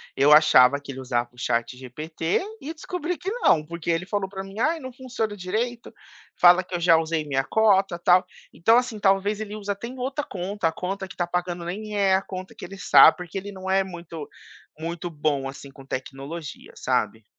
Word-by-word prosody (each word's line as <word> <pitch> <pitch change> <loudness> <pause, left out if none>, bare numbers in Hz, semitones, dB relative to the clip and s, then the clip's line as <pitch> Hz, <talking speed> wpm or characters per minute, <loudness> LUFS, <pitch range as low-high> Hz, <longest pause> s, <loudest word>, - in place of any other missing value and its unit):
eu 140 +2 +4
achava 140 -3 +6
que 140 -1 -9
ele 130 - -7
usava 120 -2 -1
o 125 - -24
chat 120 +2 -1
GPT 155 +6 -3 0.2
e 310 +4 -5
descobri 345 +1 -4
que 350 +7 -4
não, 165 - +2
porque 170 +1 -6
ele 165 +2 -1
falou 195 -1 -2
pra 190 -1 -6
mim: 195 +3 -9
"Aí, 320 +5 +1
não 260 -3 -8
funciona 240 -5 -4
direito, 230 +6 -3 0.5
fala 180 +1 +7
que 180 - -13
eu - - -1
já 170 -1 +5
usei 160 -1 -1
minha 135 -2 0
cota 195 -1 +2
tal". 180 +1 +4 0.3
Então 225 +7 +4
assim, 245 -3 -1
talvez 200 +2 +2
ele 210 -1 -6
usa 205 -1 -3
até 200 +4 -8
em 255 +2 -9
outra 270 +4 -2
conta, 190 0 -3
a - - -5
conta 190 +3 -4
que - - -11
está 175 -1 -1
pagando 175 -1 -3
nem 210 +4 -5
é 195 -2 +4
a 190 - +1
conta 185 -1 -8
que - - -12
ele 195 +2 -10
sabe, 145 -4 +7
porque 180 +1 -7
ele 200 +1 -5
não 190 -1 -7
é 195 0 +3
muito 170 -4 -8 0.5
muito 170 +2 -4
bom 145 -3 -1
assim, 140 +1 -10
com 135 0 -14
tecnologia, 140 +3 -7
sabe. 110 -3 -1
180 Hz, 210 wpm, -24 LUFS, 155-205 Hz, 0.5 s, fala